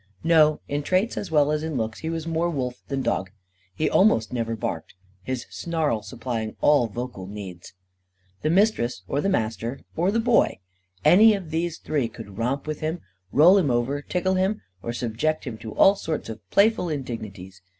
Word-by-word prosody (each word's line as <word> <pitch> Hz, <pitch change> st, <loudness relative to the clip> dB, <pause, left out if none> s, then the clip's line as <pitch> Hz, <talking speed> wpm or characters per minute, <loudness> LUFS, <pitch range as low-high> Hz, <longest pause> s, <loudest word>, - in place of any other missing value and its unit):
No, 155 Hz, -2 st, +4 dB
in 145 Hz, +1 st, -1 dB
traits 185 Hz, +9 st, +1 dB
as 200 Hz, -, -4 dB
well 150 Hz, -2 st, +3 dB
as 150 Hz, 0 st, 0 dB
in 160 Hz, -3 st, -3 dB
looks, 110 Hz, -1 st, -3 dB
he 160 Hz, -, -4 dB
was 165 Hz, -1 st, -3 dB
more 165 Hz, +1 st, 0 dB
wolf 130 Hz, -6 st, -2 dB
than 135 Hz, -2 st, -2 dB
dog. 95 Hz, -, -1 dB, 0.5 s
He 155 Hz, -, 0 dB
almost 125 Hz, -, +3 dB
never 115 Hz, -2 st, -1 dB
barked, 85 Hz, -7 st, -5 dB, 0.3 s
his 130 Hz, +4 st, -4 dB
snarl 160 Hz, -10 st, -1 dB
supplying 115 Hz, -1 st, -4 dB
all 145 Hz, -5 st, +4 dB
vocal 120 Hz, -4 st, -6 dB
needs. 95 Hz, -4 st, -9 dB, 0.7 s
The 155 Hz, -, 0 dB
Mistress 165 Hz, -, +2 dB
or 140 Hz, -, 0 dB
the 195 Hz, -, 0 dB
Master 115 Hz, -, -2 dB
or 175 Hz, +3 st, +2 dB
the 225 Hz, +3 st, +1 dB
Boy 235 Hz, 0 st, +3 dB, 0.5 s
any 215 Hz, +4 st, +7 dB
of 180 Hz, -5 st, -7 dB
these 165 Hz, +1 st, -1 dB
three 145 Hz, -6 st, -1 dB
could 100 Hz, -3 st, -10 dB
romp 130 Hz, +4 st, -1 dB
with 155 Hz, -1 st, -4 dB
him, 160 Hz, +3 st, -3 dB, 0.3 s
roll 175 Hz, +7 st, +7 dB
him 160 Hz, -7 st, +1 dB
over, 125 Hz, +4 st, 0 dB
tickle 185 Hz, +5 st, -1 dB
him, 190 Hz, +3 st, 0 dB, 0.2 s
or 115 Hz, -, -3 dB
subject 120 Hz, +7 st, -1 dB
him 115 Hz, -4 st, -6 dB
to 110 Hz, -2 st, -8 dB
all 195 Hz, -, +7 dB
sorts 160 Hz, -, -4 dB
of 110 Hz, -3 st, -9 dB
playful 200 Hz, -3 st, +3 dB
indignities. 105 Hz, -, -6 dB
145 Hz, 180 wpm, -24 LUFS, 115-170 Hz, 0.7 s, any